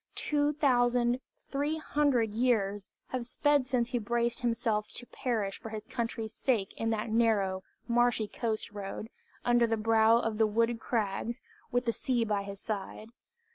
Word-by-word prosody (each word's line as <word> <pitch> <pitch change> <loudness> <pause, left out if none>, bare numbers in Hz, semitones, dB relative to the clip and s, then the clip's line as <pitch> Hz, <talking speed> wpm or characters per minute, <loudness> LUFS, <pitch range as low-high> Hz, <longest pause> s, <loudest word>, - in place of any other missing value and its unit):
Two 295 -1 +1
thousand 245 -3 +3 0.3
three 290 +3 0
hundred 285 -8 +1
years 210 -4 +1 0.2
have 255 -2 -2
sped 285 +2 +2
since 245 -3 +1
he 245 -1 0
braced 235 +1 0
himself 230 -3 0
to 245 - -4
perish 220 -7 -2
for 225 - -7
his 215 -1 -6
country's 230 -2 -3
sake 220 -7 0
in 225 - -1
that 220 0 -1
narrow, 210 -5 +2 0.3
marshy 240 -2 +2
coast 220 -1 -3
road, 205 +2 -6 0.3
under 240 -1 +4
the 225 0 0
brow 225 +1 +5
of 225 -2 -1
the 220 - +5
wooded 230 +2 +1
crags, 225 +1 -2 0.3
with 245 0 +1
the 230 - +1
sea 240 -2 0
by 210 -2 0
his 200 0 -7
side. 215 +1 -5
230 Hz, 160 wpm, -30 LUFS, 215-245 Hz, 0.3 s, brow